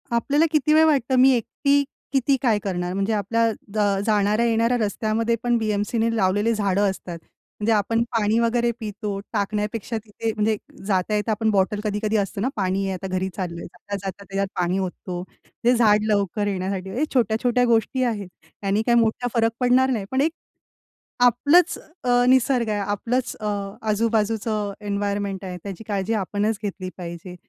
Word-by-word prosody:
आपल्याला 285 +7 +2
किती 305 -1 +3
वेळ 315 +1 +6
वाटतं 270 -5 +2
मी 265 +1 +7
एकटी 280 +4 +1 0.3
किती 270 +1 +3
काय 230 -6 +2
करणार? 180 -3 -3
म्हणजे 195 +3 0
आपल्या 215 +3 +1 0.4
अ, 200 -1 +1
जाणाऱ्या-येणाऱ्या 225 +3 +2
रस्त्यामध्ये 220 +1 0
पण 240 -1 +2
बी-एम-सीने 220 +1 0
लावलेली 205 +2 +2
झाडं 200 -1 +1
असतात. 180 -2 -6 0.4
म्हणजे 210 +2 +1
आपण 220 +2 +1
पाणी 220 -2 +1
वगैरे 235 0 +2
पितो, 210 -2 -4
टाकण्यापेक्षा 210 +2 -2
तिथे 225 +1 -3
म्हणजे 215 +1 +1 0.3
जाता 195 +1 +1
येता 210 +2 0
आपण 220 +1 +1
बॉटल 205 +1 +1
कधी-कधी 210 +1 0
असतं 195 -1 -2
ना 250 - +1
पाणी 195 -1 0
आहे 190 - -2
आता 185 +1 -5
घरी 185 0 -1
चाललंय. 170 -3 -4
जाता-जाता 200 +1 -7
त्याच्यात 195 0 -2
पाणी 180 +2 +1
ओततो. 180 -1 -4 0.4
ते 240 +1 +5
झाड 215 -3 +4
लवकर 205 0 0
येण्यासाठी 190 -1 -3
हे 270 - +1
छोट्या-छोट्या 245 +1 +2
गोष्टी 235 +2 +2
आहेत. 215 -6 -2 0.3
त्यांनी 200 +1 +1
काही 235 -1 +4
मोठा 230 +2 +1
फरक 230 -1 +2
पडणार 255 +1 +4
नाही. 220 -6 -1
पण 260 +1 +1
एक 315 +3 +2 0.9
आपलंच 285 +9 +4 0.3
अ, 245 0 +3
निसर्ग 255 -2 +3
आहे 210 -1 0
आपलंच 230 +5 -1
अ, 215 - -3 0.4
आजूबाजूचं 215 -1 0
एन्व्हायर्नमेंट 200 -1 -2
आहे 180 -1 -5
त्याची 200 +1 -7
काळजी 200 +1 -1
आपणच 205 +3 -1
घेतली 190 -2 -4
पाहिजे. 175 +1 -7
215 Hz, 160 wpm, -23 LUFS, 200-235 Hz, 0.9 s, मी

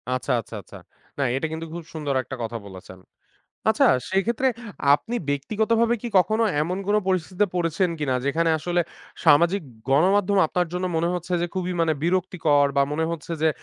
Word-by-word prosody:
আচ্ছা, 130 +2 -3
আচ্ছা, - - -11
আচ্ছা। - - -13 0.4
না, - - -2 0.2
এটা 135 - -2
কিন্তু 160 +1 -5
খুব 170 0 -6
সুন্দর 150 -3 -2
একটা 130 - -7
কথা 115 +1 -4
বলেছেন। 95 -1 -12 0.7
আচ্ছা, - - +4 0.2
সেক্ষেত্রে 225 +7 +1 0.5
আপনি 225 +10 -4
ব্যক্তিগতভাবে 220 - +1
কি 240 - -3
কখনো 220 +5 +2 0.2
এমন 180 +4 -2
কোনো 210 +1 +4
পরিস্থিতিতে 185 +2 +1
পড়েছেন 175 +1 +1
কিনা? 135 -3 0
যেখানে 165 +4 +2
আসলে 175 +3 0 0.4
সামাজিক 170 +5 +5 0.3
গণমাধ্যম 190 +8 +3
আপনার 180 +3 0
জন্য 180 +1 -2
মনে 165 +1 +1
হচ্ছে 180 +1 -5
যে, - - +1
খুবই 185 -1 -2
মানে 165 -1 +3
বিরক্তিকর, 165 -5 +2
বা 140 - +5
মনে 160 +2 0
হচ্ছে 170 0 -5
যে, 160 - +5
170 Hz, 165 wpm, -24 LUFS, 150-190 Hz, 0.7 s, সামাজিক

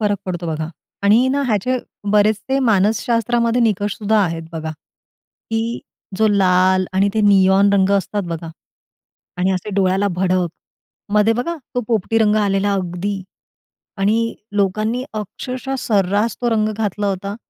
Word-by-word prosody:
फरक 205 -1 +1
पडतो 175 -2 -3
बघा. 160 0 -3 0.3
आणि 215 +5 +4
ना, 280 +2 0
ह्याचे 245 +4 0 0.3
बरेचसे 215 +5 +2
मानसशास्त्रामध्ये 230 +1 +1
निकष 205 -2 0
सुद्धा 215 0 +2
आहेत 165 -1 -3
बघा, 160 -1 -4
की 225 +8 -7 0.4
जो 220 - +3
लाल 185 -1 +3
आणि 195 +2 +2
ते 220 - +2
नियोन 200 -1 +4
रंग 195 -1 +3
असतात 200 +2 -2
बघा. 165 0 -5 0.9
आणि 180 +1 +1
असे 185 +3 -3
डोळ्याला 195 +1 +2
भडक. 185 -1 +1 0.7
मध्ये 210 +1 +4
बघा 335 +8 -2 0.2
तो 245 - +1
पोपटी 225 0 +1
रंग 215 -1 +3
आलेला 200 0 +1
अगदी. 190 +1 -3 0.7
आणि 220 +4 +1 0.2
लोकांनी 215 +5 0
अक्षरशः 250 +5 -5
सर्रास 205 -1 +1
तो 240 - 0
रंग 215 -1 +2
घातला 210 -1 -2
होता. 200 +1 -3
205 Hz, 135 wpm, -19 LUFS, 190-225 Hz, 0.9 s, आणि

